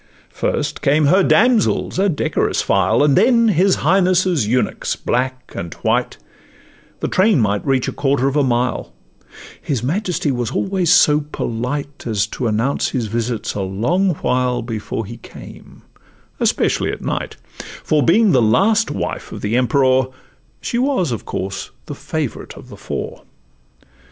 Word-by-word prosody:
First -, -, -2 dB
came 150 Hz, +2 st, +3 dB
her 185 Hz, +7 st, +4 dB
damsels, 225 Hz, -2 st, +2 dB
a 200 Hz, +1 st, +3 dB
decorous 155 Hz, -, 0 dB
file, 100 Hz, +7 st, +2 dB
And 145 Hz, -2 st, +3 dB
then 230 Hz, +3 st, +4 dB
his 190 Hz, 0 st, +3 dB
Highness' 180 Hz, -, +2 dB
eunuchs, 125 Hz, +3 st, -1 dB
black 130 Hz, 0 st, -3 dB
and 85 Hz, -, -5 dB
white; -, -, 0 dB, 0.8 s
The -, -, -1 dB
train 190 Hz, -2 st, +3 dB
might 105 Hz, -2 st, 0 dB
reach 135 Hz, -2 st, 0 dB
a -, -, -1 dB
quarter 135 Hz, -1 st, +1 dB
of 140 Hz, -, -1 dB
a 150 Hz, -, +3 dB
mile: 120 Hz, -, -1 dB, 0.7 s
His 130 Hz, -6 st, -2 dB
majesty 175 Hz, +1 st, -1 dB
was 120 Hz, -3 st, -2 dB
always 190 Hz, -3 st, 0 dB
so 150 Hz, -3 st, +5 dB
polite 140 Hz, +5 st, -4 dB
As 105 Hz, -3 st, +1 dB
to 125 Hz, -, -4 dB
announce 115 Hz, +6 st, 0 dB
his 125 Hz, -3 st, -2 dB
visits 115 Hz, +1 st, -3 dB
a 100 Hz, -, -3 dB
long 150 Hz, -, 0 dB
while 125 Hz, -1 st, 0 dB
Before 115 Hz, -1 st, -4 dB
he 115 Hz, +4 st, -9 dB
came, 110 Hz, -, -13 dB, 0.6 s
especially -, -, +1 dB
at -, -, -7 dB
night; -, -, -3 dB, 0.5 s
For 155 Hz, -1 st, +2 dB
being 195 Hz, -, +4 dB
the 130 Hz, -, +4 dB
last 205 Hz, -, +3 dB
wife -, -, -4 dB
of -, -, -7 dB
the 105 Hz, +3 st, -1 dB
Emperour, 130 Hz, 0 st, +3 dB, 0.5 s
She 240 Hz, -, -2 dB
was 255 Hz, -, +1 dB
of 115 Hz, -, -4 dB
course 95 Hz, +1 st, -4 dB, 0.2 s
the -, -, -6 dB
favorite -, -, -5 dB
of -, -, -13 dB
the -, -, -10 dB
four. -, -, -6 dB
135 Hz, 150 wpm, -19 LUFS, 120-180 Hz, 0.8 s, so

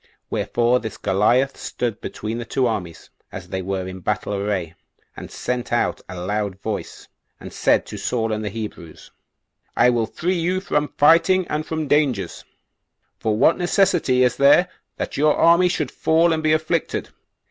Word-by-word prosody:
Wherefore 120 Hz, +1 st, +1 dB
this 110 Hz, -2 st, -7 dB
Goliath 120 Hz, +8 st, +2 dB
stood 120 Hz, -4 st, -4 dB
between 110 Hz, +2 st, -5 dB
the -, -, -4 dB
two 130 Hz, +2 st, 0 dB
armies, 90 Hz, -8 st, -4 dB, 0.2 s
as 95 Hz, -1 st, -9 dB
they 95 Hz, 0 st, -3 dB
were 95 Hz, 0 st, -3 dB
in 95 Hz, 0 st, -7 dB
battle 105 Hz, +3 st, -2 dB
array, 100 Hz, -5 st, -2 dB, 0.4 s
and -, -, -9 dB
sent 125 Hz, -1 st, -4 dB
out 120 Hz, -, 0 dB
aloud 95 Hz, +2 st, -3 dB
voice, 105 Hz, +1 st, -6 dB, 0.3 s
and -, -, -10 dB
said -, -, +2 dB
to -, -, -8 dB
Saul 115 Hz, -3 st, -1 dB
and 110 Hz, 0 st, -3 dB
the 105 Hz, -, -2 dB
Hebrews, 105 Hz, -6 st, -8 dB, 0.7 s
"I 125 Hz, -, +5 dB
will 115 Hz, -2 st, 0 dB
free 175 Hz, +8 st, -2 dB
you 180 Hz, +3 st, 0 dB
from 150 Hz, -6 st, -1 dB
fighting 170 Hz, +5 st, +4 dB
and 150 Hz, 0 st, -2 dB
from 160 Hz, -2 st, -3 dB
dangers; 130 Hz, -, 0 dB, 0.8 s
for 110 Hz, -1 st, 0 dB
what 160 Hz, +10 st, +4 dB
necessity 175 Hz, -8 st, +2 dB
is 125 Hz, -1 st, +1 dB
there 145 Hz, +6 st, +5 dB, 0.3 s
that -, -, -4 dB
your 150 Hz, +1 st, +3 dB
army 170 Hz, +2 st, +5 dB
should 150 Hz, -6 st, -2 dB
fall 165 Hz, +1 st, +2 dB
and 160 Hz, -, -1 dB
be 155 Hz, 0 st, +2 dB
afflicted? 155 Hz, 0 st, -1 dB
120 Hz, 165 wpm, -21 LUFS, 105-155 Hz, 0.8 s, I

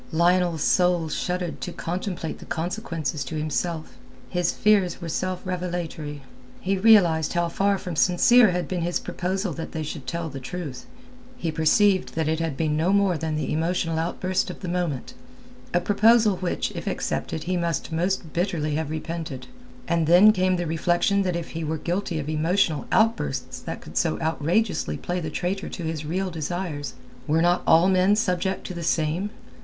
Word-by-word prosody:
Lionel's 175 Hz, -1 st, +2 dB
soul 180 Hz, -3 st, +3 dB
shuddered 180 Hz, +1 st, -3 dB
to 180 Hz, -, -4 dB
contemplate 175 Hz, -1 st, -4 dB
the -, -, -11 dB
consequences 165 Hz, -, -3 dB
to 155 Hz, -, -6 dB
himself. 155 Hz, +1 st, -3 dB, 0.3 s
His 180 Hz, -2 st, +1 dB
fears 200 Hz, -5 st, +2 dB
were 170 Hz, -2 st, -6 dB
self 185 Hz, +3 st, -2 dB
revelatory. 175 Hz, -5 st, -4 dB, 0.4 s
He 195 Hz, +1 st, 0 dB
realized 185 Hz, -7 st, +5 dB
how 175 Hz, -1 st, +1 dB
far 200 Hz, +3 st, +1 dB
from 180 Hz, -3 st, -6 dB
sincere 210 Hz, +8 st, +5 dB
had 180 Hz, 0 st, -1 dB
been 180 Hz, -2 st, -2 dB
his 175 Hz, +1 st, 0 dB
proposal 190 Hz, 0 st, -2 dB
that 165 Hz, -, -6 dB
they 160 Hz, -, -3 dB
should 150 Hz, -2 st, -6 dB
tell 170 Hz, -1 st, -3 dB
the 135 Hz, -3 st, -7 dB
truth; 135 Hz, -2 st, -6 dB, 0.5 s
he 170 Hz, -9 st, -2 dB
perceived 185 Hz, +5 st, +3 dB
that 160 Hz, -1 st, 0 dB
it 160 Hz, 0 st, 0 dB
had 165 Hz, -4 st, -2 dB
been 155 Hz, -2 st, 0 dB
no 165 Hz, +5 st, +2 dB
more 200 Hz, -2 st, +3 dB
than 160 Hz, -1 st, -2 dB
the 155 Hz, -, -2 dB
emotional 165 Hz, 0 st, 0 dB
outburst 180 Hz, +2 st, -1 dB
of -, -, -8 dB
the 185 Hz, -, -5 dB
moment, 175 Hz, -7 st, -2 dB, 0.6 s
a 175 Hz, -, +3 dB
proposal 215 Hz, +2 st, +4 dB
which 180 Hz, -1 st, -2 dB
if -, -, -7 dB
accepted 155 Hz, -, -2 dB
he 185 Hz, +1 st, -1 dB
must 170 Hz, -4 st, -2 dB
most 175 Hz, 0 st, -1 dB
bitterly 170 Hz, -4 st, -1 dB
have 155 Hz, 0 st, -2 dB
repented. 160 Hz, -3 st, -5 dB, 0.4 s
And 170 Hz, -2 st, +1 dB
then 180 Hz, +6 st, +8 dB
came 185 Hz, -2 st, +2 dB
the 175 Hz, -1 st, -2 dB
reflection 175 Hz, +5 st, +1 dB
that 180 Hz, -3 st, 0 dB
if 170 Hz, -1 st, -4 dB
he 165 Hz, 0 st, -4 dB
were 160 Hz, +1 st, -2 dB
guilty 175 Hz, +1 st, -2 dB
of 150 Hz, -2 st, -4 dB
emotional 155 Hz, +1 st, +1 dB
outbursts 225 Hz, +1 st, +1 dB
that -, -, -6 dB
could -, -, -12 dB
so -, -, 0 dB
outrageously 165 Hz, +7 st, 0 dB
play 180 Hz, 0 st, -3 dB
the 160 Hz, -3 st, -4 dB
traitor 185 Hz, +5 st, -2 dB
to 175 Hz, -, -6 dB
his 160 Hz, -2 st, -3 dB
real 185 Hz, +3 st, -1 dB
desires, 160 Hz, -3 st, -4 dB, 0.3 s
were 160 Hz, +2 st, +3 dB
not 175 Hz, +1 st, +3 dB
all 165 Hz, +3 st, +6 dB
men 190 Hz, +2 st, +4 dB
subject 190 Hz, -3 st, -1 dB
to -, -, -5 dB
the 170 Hz, -, -6 dB
same? 165 Hz, +4 st, 0 dB
175 Hz, 180 wpm, -25 LUFS, 160-185 Hz, 0.6 s, then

